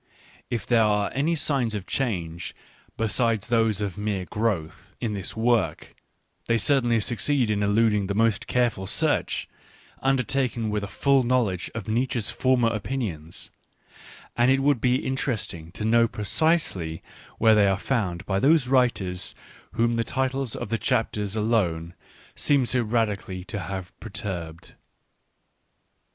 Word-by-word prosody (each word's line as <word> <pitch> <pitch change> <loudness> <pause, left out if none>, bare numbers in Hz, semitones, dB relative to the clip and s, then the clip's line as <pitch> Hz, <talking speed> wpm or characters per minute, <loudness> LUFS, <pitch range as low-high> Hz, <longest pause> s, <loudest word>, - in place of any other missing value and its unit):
Ittliere 115 0 +2
are 105 -1 +1
any 150 +5 +1
signs 135 -8 0
of 100 -3 -4
change, 85 -10 -3 0.4
besides 115 -1 +1
those 115 -3 +1
of 100 -1 -3
mere 105 -3 -2
growth, 95 -3 -3
in 115 -3 -2
this 100 +1 -3
work, 110 -8 0 0.5
they 115 - +3
certainly 120 -1 +3
succeed 120 +2 0
in 105 -1 0
eluding 105 -1 +2
the 100 - -2
most 115 0 +1
careful 120 -6 0
search, - - +1 0.5
undertaken 125 -3 0
with 105 -1 -1
a - - -3
full 140 +6 +2
knowledge 120 -7 0
of 115 -4 -5
Nietzsche's 120 -1 0
former 130 -3 +2
opinions, 105 - -4 0.8
and 120 +1 +3
it 135 0 +3
would 140 -4 +2
be 125 0 +1
inter 130 0 0
esting 85 -6 -7
to 105 - -4
know 115 +1 +4
precisely 105 - 0 0.3
where 110 -1 +5
they 105 -2 +5
are 95 -1 +2
found 100 -7 -2
by 95 -1 0
those 145 +1 +4
writers 120 -9 +1 0.4
whom 115 0 +1
the 115 - +1
titles 130 -1 -1
of - - -5
the 115 - -1
chapters, 105 -2 -1
alone, 95 -7 0 0.4
seem 140 -3 +2
so 125 +2 +1
radically 105 -5 -1
to 100 - -5
have 95 0 -6
perturbed. 95 -7 -6
110 Hz, 140 wpm, -25 LUFS, 100-125 Hz, 0.8 s, where